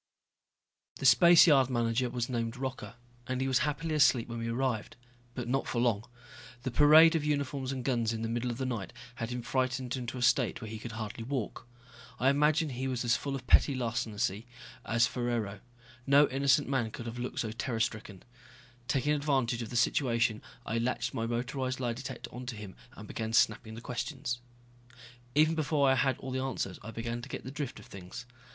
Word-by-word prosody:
The -, -, -6 dB
spaceyard 145 Hz, 0 st, +7 dB
manager 120 Hz, 0 st, 0 dB
was 120 Hz, -1 st, -2 dB
named 115 Hz, -1 st, -3 dB
Rocca, 125 Hz, -4 st, -5 dB, 0.3 s
and 130 Hz, 0 st, -2 dB
he 135 Hz, -, 0 dB
was 130 Hz, -1 st, +3 dB
happily 150 Hz, +2 st, -1 dB
asleep 135 Hz, -5 st, +4 dB
when 115 Hz, 0 st, -5 dB
we 115 Hz, -, -3 dB
arrived. 120 Hz, -2 st, -2 dB, 0.4 s
But 125 Hz, -2 st, -4 dB
not 135 Hz, +2 st, 0 dB
for 120 Hz, -, -1 dB
long. 115 Hz, -3 st, +1 dB, 0.6 s
The 130 Hz, -, -2 dB
parade 155 Hz, +5 st, +7 dB
of 160 Hz, -, +1 dB
uniforms 140 Hz, -3 st, -1 dB
and 130 Hz, -2 st, -5 dB
guns 120 Hz, -4 st, +1 dB
in 115 Hz, 0 st, -3 dB
the -, -, -1 dB
middle 120 Hz, +2 st, -2 dB
of 120 Hz, -, -4 dB
the 130 Hz, -, -2 dB
night 115 Hz, -8 st, -4 dB, 0.2 s
had 115 Hz, -1 st, -3 dB
him 125 Hz, -1 st, -4 dB
frightened 130 Hz, 0 st, -1 dB
into 125 Hz, -1 st, -5 dB
a 125 Hz, -, -2 dB
state 125 Hz, +1 st, +2 dB
where 110 Hz, -3 st, -7 dB
he 110 Hz, -, -6 dB
could 115 Hz, +1 st, -7 dB
hardly 110 Hz, 0 st, -5 dB
walk. 125 Hz, -2 st, -4 dB, 0.5 s
I 130 Hz, +2 st, +4 dB
imagine 150 Hz, +2 st, +2 dB
he 130 Hz, 0 st, -3 dB
was 125 Hz, -2 st, -2 dB
as 115 Hz, -, +3 dB
full 140 Hz, -1 st, -3 dB
of 130 Hz, -2 st, -7 dB
petty 140 Hz, +2 st, +5 dB
larceny 115 Hz, -3 st, -2 dB, 0.4 s
as 115 Hz, +1 st, +3 dB
Ferraro. 120 Hz, -4 st, -2 dB, 0.5 s
No 140 Hz, +1 st, +6 dB
innocent 140 Hz, +1 st, +2 dB
man 130 Hz, -5 st, 0 dB
could 115 Hz, -, -8 dB
have 120 Hz, +1 st, -6 dB
looked 125 Hz, -, -3 dB
so 110 Hz, -, -3 dB
terror 115 Hz, +1 st, -3 dB
stricken. 110 Hz, -4 st, -3 dB, 0.6 s
Taking 145 Hz, +2 st, +1 dB
advantage 135 Hz, -5 st, 0 dB
of 115 Hz, -, -5 dB
the -, -, -7 dB
situation, 115 Hz, -3 st, +2 dB, 0.2 s
I 115 Hz, +1 st, -1 dB
latched 120 Hz, 0 st, -1 dB
my 115 Hz, -, -2 dB
motorized 130 Hz, +2 st, -2 dB
lie 120 Hz, -2 st, -1 dB
detector 130 Hz, +3 st, -7 dB
onto 125 Hz, -1 st, -6 dB
him 105 Hz, -3 st, -9 dB, 0.2 s
and 105 Hz, -, -10 dB
began 110 Hz, +1 st, -4 dB
snapping 110 Hz, -1 st, +2 dB
the 115 Hz, -, -8 dB
questions. 125 Hz, +1 st, -4 dB, 1.0 s
Even 155 Hz, +2 st, +5 dB
before 150 Hz, -3 st, +1 dB
I 135 Hz, -, +5 dB
had 135 Hz, -1 st, +1 dB
all 130 Hz, -, -7 dB
the 130 Hz, -, -1 dB
answers 130 Hz, -8 st, -3 dB
I 105 Hz, -, -8 dB
began 115 Hz, +1 st, -4 dB
to -, -, -10 dB
get -, -, -6 dB
the 130 Hz, -, -7 dB
drift 145 Hz, -3 st, -5 dB
of -, -, -13 dB
things. 95 Hz, +4 st, -9 dB
125 Hz, 200 wpm, -30 LUFS, 115-135 Hz, 1.0 s, spaceyard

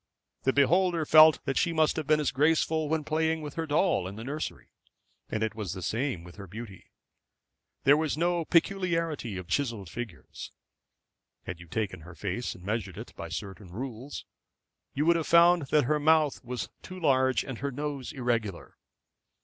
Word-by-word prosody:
The 130 Hz, -, +4 dB
beholder 170 Hz, +4 st, +3 dB
felt 155 Hz, +1 st, +7 dB
that 135 Hz, -, -1 dB
she 170 Hz, -, +1 dB
must 155 Hz, -1 st, +2 dB
have 155 Hz, -3 st, -3 dB
been 155 Hz, 0 st, +4 dB
as 150 Hz, -, 0 dB
graceful 155 Hz, +1 st, +2 dB
when 160 Hz, -1 st, 0 dB
playing 160 Hz, +1 st, 0 dB
with 150 Hz, -, -6 dB
her 165 Hz, -1 st, -3 dB
doll 150 Hz, -, +2 dB
in 95 Hz, -, -7 dB
the 110 Hz, -, -7 dB
nursery. 150 Hz, +5 st, -5 dB, 0.6 s
And 110 Hz, -, -1 dB
it 110 Hz, -, -1 dB
was 105 Hz, -6 st, -4 dB
the 95 Hz, -, -7 dB
same 115 Hz, -1 st, -2 dB
with 85 Hz, +3 st, -13 dB
her 100 Hz, -1 st, -9 dB
beauty. 100 Hz, 0 st, -9 dB, 1.0 s
There 140 Hz, +2 st, +7 dB
was 155 Hz, -1 st, -1 dB
no 170 Hz, +1 st, +1 dB
peculiarity 165 Hz, -, 0 dB
of 90 Hz, -2 st, -7 dB
chiselled 110 Hz, -3 st, -2 dB
features. 105 Hz, -, -7 dB, 0.9 s
Had 90 Hz, -, -6 dB
you 90 Hz, -, -12 dB
taken 95 Hz, -1 st, -3 dB
her 85 Hz, +1 st, -12 dB
face 105 Hz, +8 st, -3 dB
and 90 Hz, -, -14 dB
measured 100 Hz, -2 st, -3 dB
it 110 Hz, -, -9 dB
by 85 Hz, -, -7 dB
certain 95 Hz, +2 st, -7 dB
rules, 125 Hz, +6 st, -6 dB, 0.7 s
you 145 Hz, +3 st, +1 dB
would 170 Hz, 0 st, +5 dB
have 165 Hz, -, -3 dB
found 170 Hz, -2 st, +5 dB
that 150 Hz, +1 st, +3 dB
her 150 Hz, +4 st, +1 dB
mouth 155 Hz, -2 st, +3 dB
was 125 Hz, -6 st, -4 dB
too 185 Hz, 0 st, -9 dB
large 130 Hz, -5 st, +3 dB
and 130 Hz, -4 st, -7 dB
her 140 Hz, -, -2 dB
nose 140 Hz, -1 st, -4 dB
irregular. 115 Hz, -7 st, -3 dB
135 Hz, 180 wpm, -28 LUFS, 105-155 Hz, 1.0 s, felt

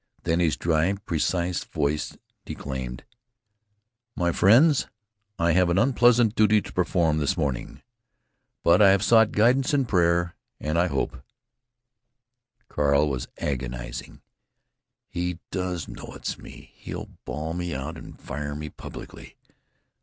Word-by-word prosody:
Then 85 Hz, +1 st, +1 dB
his 85 Hz, -3 st, +2 dB
dry, 85 Hz, +3 st, +1 dB
precise 90 Hz, -1 st, -1 dB
voice 75 Hz, 0 st, -2 dB, 0.3 s
declaimed: 65 Hz, -2 st, -6 dB, 1.1 s
"My 85 Hz, -1 st, +1 dB
friends, 130 Hz, -, +5 dB, 0.5 s
I 85 Hz, 0 st, +2 dB
have 90 Hz, +1 st, +3 dB
an 85 Hz, -, +1 dB
unpleasant 120 Hz, -1 st, +4 dB
duty 110 Hz, -1 st, +4 dB
to -, -, -10 dB
perform 85 Hz, -3 st, +1 dB
this 75 Hz, -, 0 dB
morning, 65 Hz, -4 st, -3 dB, 0.8 s
but 85 Hz, +4 st, +5 dB
I 100 Hz, -, +8 dB
have 95 Hz, 0 st, +3 dB
sought 110 Hz, -1 st, +5 dB
guidance 130 Hz, +7 st, +3 dB
in 135 Hz, -2 st, +2 dB
prayer, 85 Hz, -4 st, +2 dB, 0.3 s
and 75 Hz, +3 st, -1 dB
I 90 Hz, -, +3 dB
hope——" 65 Hz, -, -2 dB, 1.5 s
Carl 75 Hz, +1 st, +2 dB
was 65 Hz, -2 st, -3 dB
agonizing: -, -, -5 dB, 0.9 s
"He 90 Hz, 0 st, -3 dB
does 90 Hz, -3 st, -3 dB
know -, -, -9 dB
it's -, -, -4 dB
me! -, -, -13 dB
He'll -, -, -7 dB
ball 75 Hz, +4 st, -4 dB
me 85 Hz, -2 st, -3 dB
out 70 Hz, +5 st, -5 dB
and -, -, -11 dB
fire 75 Hz, 0 st, -5 dB
me 75 Hz, +1 st, -5 dB
publicly!... -, -, -10 dB
85 Hz, 130 wpm, -25 LUFS, 75-95 Hz, 1.5 s, I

